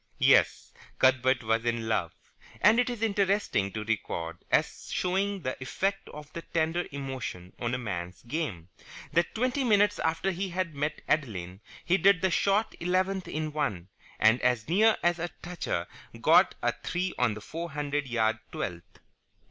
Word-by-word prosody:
Yes, -, -, +3 dB, 0.2 s
Cuthbert 130 Hz, -1 st, +3 dB
was 115 Hz, +1 st, +1 dB
in 115 Hz, -1 st, -1 dB
love: 95 Hz, -7 st, -1 dB, 0.4 s
and 215 Hz, +4 st, +5 dB
it 245 Hz, -, +2 dB
is 235 Hz, -2 st, -4 dB
interesting 200 Hz, -, +1 dB
to 110 Hz, -, -3 dB
record, 85 Hz, -6 st, -3 dB
as -, -, 0 dB
showing 195 Hz, +1 st, 0 dB
the 130 Hz, -, -2 dB
effect 195 Hz, +9 st, -2 dB
of 150 Hz, 0 st, -11 dB
the 170 Hz, -, -5 dB
tender 165 Hz, +1 st, -1 dB
emotion 130 Hz, -10 st, -6 dB
on 120 Hz, +1 st, -1 dB
a -, -, -1 dB
man's 90 Hz, -7 st, -5 dB
game, 120 Hz, -, -4 dB, 0.4 s
that 170 Hz, +1 st, +1 dB
twenty 255 Hz, +4 st, 0 dB
minutes 205 Hz, -3 st, +3 dB
after 165 Hz, +4 st, 0 dB
he 190 Hz, +2 st, -3 dB
had 175 Hz, -2 st, -2 dB
met 150 Hz, +2 st, -3 dB
Adeline 100 Hz, -, -1 dB, 0.2 s
he 180 Hz, -, +3 dB
did 195 Hz, -2 st, +4 dB
the 190 Hz, -, +3 dB
short 200 Hz, +5 st, +2 dB
eleventh 185 Hz, +2 st, 0 dB
in 155 Hz, 0 st, -3 dB
one, 100 Hz, -, -2 dB, 0.3 s
and 110 Hz, +3 st, +5 dB
as 125 Hz, -3 st, +1 dB
near 215 Hz, +7 st, +4 dB
as 175 Hz, 0 st, +2 dB
a 175 Hz, +1 st, -2 dB
toucher 175 Hz, -, -3 dB, 0.3 s
got -, -, +5 dB
a -, -, +3 dB
three 180 Hz, +1 st, -3 dB
on 120 Hz, -4 st, +2 dB
the -, -, -7 dB
four 170 Hz, +8 st, -6 dB
hundred 145 Hz, -1 st, -2 dB
yard 110 Hz, -2 st, +1 dB
twelfth. 85 Hz, -2 st, -6 dB
150 Hz, 165 wpm, -28 LUFS, 115-185 Hz, 0.4 s, and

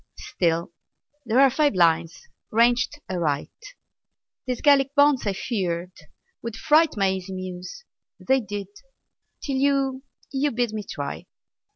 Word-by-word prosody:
Still, 170 Hz, -1 st, -1 dB, 0.6 s
there 230 Hz, +3 st, +3 dB
are 275 Hz, -1 st, +6 dB
five 295 Hz, -4 st, +2 dB
lines 165 Hz, -1 st, +1 dB, 0.2 s
ranged 235 Hz, +5 st, +2 dB
aright. 160 Hz, -6 st, -2 dB, 1.0 s
These 250 Hz, -2 st, -2 dB
Gallic 280 Hz, -1 st, +4 dB
bonds, 285 Hz, -5 st, +4 dB
I 200 Hz, -, +1 dB
feared, 185 Hz, -5 st, -3 dB, 0.5 s
would 230 Hz, -1 st, -5 dB
fright 315 Hz, +1 st, +3 dB
My 195 Hz, -1 st, +2 dB
easy 190 Hz, 0 st, -5 dB
Muse. 185 Hz, -, -7 dB, 0.4 s
They 265 Hz, +1 st, +2 dB
did, 205 Hz, -2 st, -6 dB, 0.7 s
till 275 Hz, -2 st, -2 dB
you 270 Hz, -1 st, +1 dB, 0.3 s
You 280 Hz, +2 st, +1 dB
bid 240 Hz, -2 st, -1 dB
me 215 Hz, -, -3 dB
try! 140 Hz, -1 st, -5 dB
225 Hz, 130 wpm, -24 LUFS, 185-270 Hz, 1.0 s, are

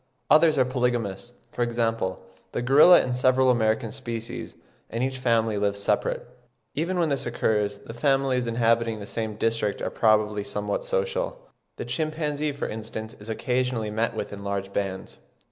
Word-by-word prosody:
Others 155 Hz, -1 st, +6 dB
are 130 Hz, -, +4 dB
polygamous, 120 Hz, -4 st, -1 dB, 0.2 s
for -, -, -5 dB
example 115 Hz, -6 st, -1 dB, 0.3 s
the 120 Hz, -, -2 dB
gorilla 145 Hz, +8 st, +7 dB
and 125 Hz, -1 st, -2 dB
several 130 Hz, +1 st, +4 dB
American 110 Hz, -1 st, +1 dB
species, 115 Hz, -4 st, -5 dB, 0.3 s
and 115 Hz, +2 st, -2 dB
each 130 Hz, 0 st, -2 dB
family 115 Hz, -4 st, +1 dB
lives 100 Hz, 0 st, 0 dB
separate. 105 Hz, +3 st, 0 dB, 0.5 s
Even 170 Hz, +6 st, -1 dB
when 170 Hz, -3 st, +2 dB
this 140 Hz, -3 st, -1 dB
occurs, 105 Hz, -3 st, 0 dB
the -, -, -8 dB
families 135 Hz, -1 st, +1 dB
inhabiting 115 Hz, -1 st, +1 dB
the 100 Hz, -, -7 dB
same 110 Hz, 0 st, -3 dB
district 115 Hz, -1 st, 0 dB
are -, -, -3 dB
probably 105 Hz, -2 st, +2 dB
somewhat -, -, -2 dB
social; -, -, -1 dB, 0.4 s
the -, -, -5 dB
chimpanzee, 155 Hz, -2 st, -1 dB
for 140 Hz, -, -4 dB
instance, 110 Hz, +1 st, -6 dB
is 105 Hz, +2 st, -10 dB
occasionally 125 Hz, -1 st, -1 dB
met 110 Hz, +2 st, -1 dB
with -, -, -4 dB
in 100 Hz, 0 st, -8 dB
large 100 Hz, -1 st, -3 dB
bands. 95 Hz, -2 st, -4 dB
115 Hz, 160 wpm, -26 LUFS, 110-135 Hz, 0.5 s, gorilla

